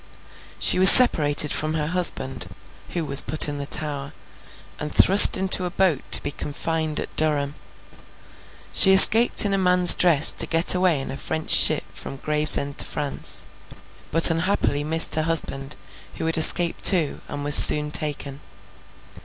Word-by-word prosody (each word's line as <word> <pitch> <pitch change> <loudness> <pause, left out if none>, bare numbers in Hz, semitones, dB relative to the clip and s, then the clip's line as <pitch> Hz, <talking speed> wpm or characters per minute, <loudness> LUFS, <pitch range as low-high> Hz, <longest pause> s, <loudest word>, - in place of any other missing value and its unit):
She - - +2
was 190 +1 +10
separated 150 - +4
from 155 +1 -6
her 150 -2 -7
husband 135 - -2 0.4
(who 170 -2 -9
was 140 -1 +4
put 155 - 0
in 145 -1 -10
the 140 - -11
Tower) 145 -3 -8 0.7
and 150 0 -10
thrust 195 +2 +6
into 190 -1 -3
a - - -8
boat 175 -6 -5
to - - +1
be 145 - -8
confined 155 +1 -8
at - - -12
Durham. 145 -2 -4 1.2
She 190 - +4
escaped 220 +4 +4
in 200 - -6
a 195 - -5
man's 180 -1 +2
dress 160 -4 -1
to - - -6
get 165 +1 +1
away 180 -5 -4
in 135 - -10
a 135 - -12
French 160 +1 -9
ship - - +1
from - - -13
Gravesend 150 -1 -2
to - - -3
France, 145 -2 -4 0.7
but 165 +2 +1
unhappily 165 -4 -6
missed 160 +2 +1
her 155 - -3
husband, 150 -3 -1 0.4
who - - -10
had 165 - -5
escaped 170 +2 +1
too, 170 -7 -3
and 145 0 -11
was 145 0 -5
soon 150 0 +4
taken. 145 -2 -8
155 Hz, 160 wpm, -17 LUFS, 145-180 Hz, 1.2 s, was